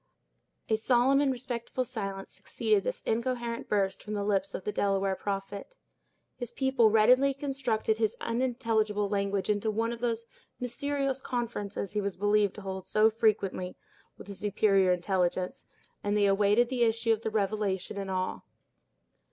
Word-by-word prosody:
A 220 Hz, -, +2 dB
solemn 255 Hz, +4 st, +3 dB
and 280 Hz, -2 st, +2 dB
respectful 250 Hz, 0 st, -3 dB
silence 195 Hz, -4 st, -5 dB
succeeded 420 Hz, -2 st, 0 dB
this -, -, -3 dB
incoherent 235 Hz, 0 st, -2 dB
burst 195 Hz, -2 st, 0 dB
from 210 Hz, 0 st, -5 dB
the 205 Hz, -, -1 dB
lips 195 Hz, -1 st, 0 dB
of -, -, -5 dB
the 210 Hz, -, -2 dB
Delaware 195 Hz, -1 st, +1 dB
prophet. 200 Hz, -, -5 dB, 0.6 s
His 245 Hz, -2 st, -5 dB
people 265 Hz, -4 st, +3 dB
readily 250 Hz, +6 st, +5 dB
constructed 255 Hz, -6 st, -1 dB
his 220 Hz, -2 st, +1 dB
unintelligible 230 Hz, -4 st, 0 dB
language 200 Hz, -1 st, -1 dB
into 210 Hz, +1 st, +1 dB
one 225 Hz, +2 st, 0 dB
of 235 Hz, -, -7 dB
those 230 Hz, -1 st, -1 dB, 0.3 s
mysterious 275 Hz, +2 st, -2 dB
conferences 215 Hz, -6 st, -3 dB
he 210 Hz, -, -1 dB
was 200 Hz, -1 st, -2 dB
believed 205 Hz, 0 st, +2 dB
to 210 Hz, -, -8 dB
hold 190 Hz, -1 st, -6 dB
so 215 Hz, +1 st, +4 dB
frequently 205 Hz, -5 st, 0 dB, 0.4 s
with -, -, -12 dB
a 200 Hz, -, -6 dB
superior 195 Hz, -2 st, +2 dB
intelligence 180 Hz, 0 st, -1 dB, 0.4 s
and 205 Hz, +1 st, +1 dB
they 205 Hz, -, +4 dB
awaited 205 Hz, +4 st, +3 dB
the 255 Hz, -2 st, -2 dB
issue 230 Hz, 0 st, +3 dB
of 220 Hz, -, -3 dB
the 220 Hz, -, -2 dB
revelation 205 Hz, -2 st, -1 dB
in 195 Hz, -1 st, -4 dB
awe. 185 Hz, -1 st, -2 dB
215 Hz, 155 wpm, -29 LUFS, 200-240 Hz, 0.6 s, readily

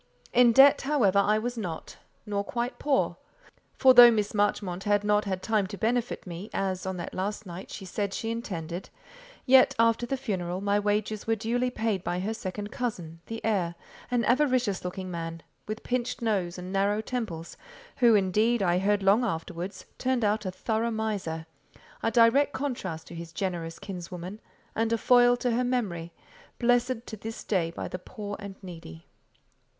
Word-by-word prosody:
In 245 Hz, -1 st, +6 dB
debt, 270 Hz, +4 st, +7 dB
however, 240 Hz, -9 st, +3 dB
I 210 Hz, +2 st, +3 dB
was 240 Hz, +2 st, -3 dB
not; 175 Hz, -6 st, -6 dB, 0.3 s
nor 200 Hz, -1 st, -1 dB
quite 240 Hz, +4 st, -3 dB
poor; 280 Hz, -2 st, +1 dB, 0.6 s
for 260 Hz, -1 st, +6 dB
though 245 Hz, -1 st, +11 dB
Miss 210 Hz, -3 st, 0 dB
Marchmont 200 Hz, -2 st, 0 dB
had 205 Hz, 0 st, +2 dB
not 210 Hz, 0 st, +2 dB
had 190 Hz, -2 st, -3 dB
time 215 Hz, -3 st, +1 dB
to 200 Hz, -, -7 dB
benefit 235 Hz, +4 st, -1 dB
me, 180 Hz, +4 st, -7 dB
as, 190 Hz, -1 st, -1 dB
on 190 Hz, -1 st, -3 dB
that 170 Hz, -, -6 dB
last 205 Hz, +3 st, -3 dB
night, 180 Hz, +1 st, -8 dB
she 195 Hz, -, -7 dB
said 200 Hz, +2 st, -2 dB
she 225 Hz, +3 st, -3 dB
intended, 180 Hz, -6 st, -5 dB, 0.6 s
yet, 260 Hz, 0 st, +6 dB
after 230 Hz, +1 st, +3 dB
the 270 Hz, -, -1 dB
funeral, 185 Hz, -8 st, -3 dB
my 200 Hz, +1 st, +1 dB
wages 210 Hz, +1 st, -1 dB
were 225 Hz, -, +3 dB
duly 240 Hz, +3 st, 0 dB
paid 220 Hz, -6 st, -1 dB
by 175 Hz, -, -2 dB
her 205 Hz, +4 st, -2 dB
second 205 Hz, 0 st, -5 dB
cousin, 175 Hz, -10 st, -4 dB
the 225 Hz, 0 st, -6 dB
heir, 185 Hz, -6 st, 0 dB, 0.3 s
an 245 Hz, -1 st, +1 dB
avaricious 250 Hz, -6 st, +2 dB
looking 185 Hz, +1 st, -5 dB
man, 165 Hz, -1 st, -5 dB, 0.2 s
with 215 Hz, +1 st, -5 dB
pinched 250 Hz, -1 st, -2 dB
nose 195 Hz, -6 st, -1 dB
and 180 Hz, +1 st, -7 dB
narrow 200 Hz, +2 st, +2 dB
temples, 215 Hz, -8 st, -4 dB, 0.4 s
who, 235 Hz, -4 st, +6 dB
indeed, 210 Hz, +3 st, +2 dB
I 175 Hz, -1 st, +2 dB
heard 200 Hz, +1 st, +1 dB
long 200 Hz, +5 st, +4 dB
afterwards, 175 Hz, -1 st, -4 dB
turned 255 Hz, -3 st, +1 dB
out 210 Hz, -1 st, 0 dB
a -, -, -2 dB
thorough 220 Hz, +4 st, -1 dB
miser: 205 Hz, -8 st, -3 dB, 0.6 s
a -, -, +1 dB
direct 240 Hz, +5 st, +4 dB
contrast 195 Hz, -, -4 dB
to -, -, -9 dB
his 170 Hz, 0 st, -7 dB
generous 170 Hz, -3 st, -3 dB
kinswoman, 180 Hz, +1 st, -7 dB, 0.3 s
and 225 Hz, 0 st, 0 dB
a 230 Hz, -, +3 dB
foil 245 Hz, +1 st, +5 dB
to 245 Hz, 0 st, 0 dB
her 240 Hz, +2 st, +1 dB
memory, 200 Hz, -10 st, -2 dB, 0.5 s
blessed 245 Hz, 0 st, +1 dB
to 220 Hz, -, -7 dB
this 225 Hz, +2 st, -7 dB
day 180 Hz, -5 st, 0 dB
by 170 Hz, -, -5 dB
the 180 Hz, -, -5 dB
poor 205 Hz, +1 st, -7 dB
and 200 Hz, -2 st, -8 dB
needy. 165 Hz, -, -10 dB
210 Hz, 175 wpm, -28 LUFS, 185-235 Hz, 0.6 s, though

